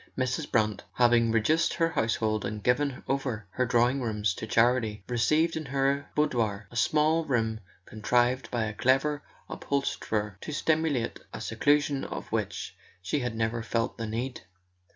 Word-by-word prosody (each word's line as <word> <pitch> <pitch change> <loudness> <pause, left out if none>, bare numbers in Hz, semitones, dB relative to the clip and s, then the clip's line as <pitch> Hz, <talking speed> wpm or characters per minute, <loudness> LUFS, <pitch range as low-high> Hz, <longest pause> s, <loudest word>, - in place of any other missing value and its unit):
Mrs. 130 +4 -1
Brant, 105 -4 +1
having 120 -2 +4
reduced 135 +9 +2
her 165 -1 +2
household 110 - 0
and 105 0 -4
given 135 +2 +1
over 130 -6 -2
her 125 +4 0
drawing 120 +3 +2
rooms 105 -4 0
to 110 - -6
charity, 115 -3 +2
received 155 +7 +2
in 160 -1 -4
her 140 +1 0
boudoir, 110 -9 0
a - - -13
small 155 +6 +3
room 115 -6 0 0.3
contrived 120 +4 +1
by 120 -2 -1
a 110 0 -3
clever 135 +6 +2 0.3
upholsterer 105 -7 -2
to - - -6
simulate 155 -5 0 0.2
a - - -6
seclusion 145 -1 +1
of - - -6
which - - -3 0.3
she 145 +10 0
had 120 -3 -3
never 115 +1 -1
felt 115 +1 -2
the 115 - -3
need. 120 +4 -4
120 Hz, 150 wpm, -28 LUFS, 110-140 Hz, 0.3 s, having